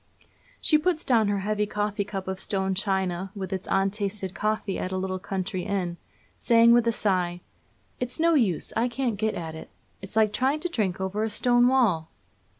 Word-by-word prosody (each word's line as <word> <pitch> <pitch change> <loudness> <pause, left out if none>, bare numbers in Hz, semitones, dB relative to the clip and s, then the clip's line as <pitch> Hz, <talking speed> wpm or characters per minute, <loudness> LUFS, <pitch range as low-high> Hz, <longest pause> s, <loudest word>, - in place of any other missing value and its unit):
She 305 - +3
puts 335 0 0
down 230 -5 +3
her 200 -1 0
heavy 210 +1 0
coffee 205 0 -1
cup 195 -2 -6
of 190 0 -3
stone 190 -1 -1
china 190 -1 -1
with 190 -1 -4
its 190 +1 -4
untasted 195 0 -1
coffee 215 -2 -1
at 185 - -3
a 190 - -1
little 185 0 -2
country 190 -1 -3
inn, 180 -2 -2 0.4
saying, 230 0 +6
with 240 -1 +4
a - - +4
sigh: 180 -5 0 0.6
'It's 250 +4 -3
no 335 +1 +4
use; 220 - +1
I 235 - +2
can't 245 -3 -2
get 220 0 0
at 160 -2 -5
it; 160 - -9 0.3
it's 195 +2 -9
like 215 -1 +3
trying 270 +6 +1
to 355 - -1
drink 200 - -1
over 190 +2 -2
a 220 - 0
stone 245 +2 +3
wall.' 215 -12 +2
205 Hz, 190 wpm, -26 LUFS, 190-230 Hz, 0.6 s, saying